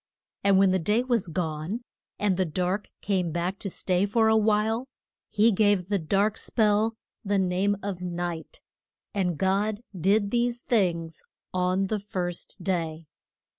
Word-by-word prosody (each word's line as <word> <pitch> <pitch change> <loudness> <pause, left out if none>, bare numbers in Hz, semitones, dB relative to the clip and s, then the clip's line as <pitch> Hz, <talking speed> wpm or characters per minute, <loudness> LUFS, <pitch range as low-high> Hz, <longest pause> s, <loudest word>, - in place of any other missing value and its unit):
And 200 -1 +5
when 195 -1 +5
the 190 - +2
day 210 +8 +1
was 240 -7 0
gone, 165 +6 -3 0.3
and 205 -2 +1
the 185 - +2
dark 180 +4 -2
came 185 -4 0
back 175 +4 -2
to 200 - -4
stay 185 +1 0
for 220 +2 +3
a 220 - +4
while, 220 +3 +2 0.4
he 220 +2 +4
gave 205 -3 +2
the 200 -1 +1
dark 200 +6 +1
spell 220 0 +1 0.3
the 200 -1 +1
name 190 +2 +1
of 195 -3 -4
Night. 175 -2 -4 0.5
And 180 -5 0
God 205 +4 +1
did 200 +4 +2
these 240 0 +1
things 170 -9 0 0.3
on 185 +1 +1
the 210 +2 -1
first 180 -2 -5
day. 165 -4 -2
195 Hz, 150 wpm, -27 LUFS, 180-210 Hz, 0.5 s, And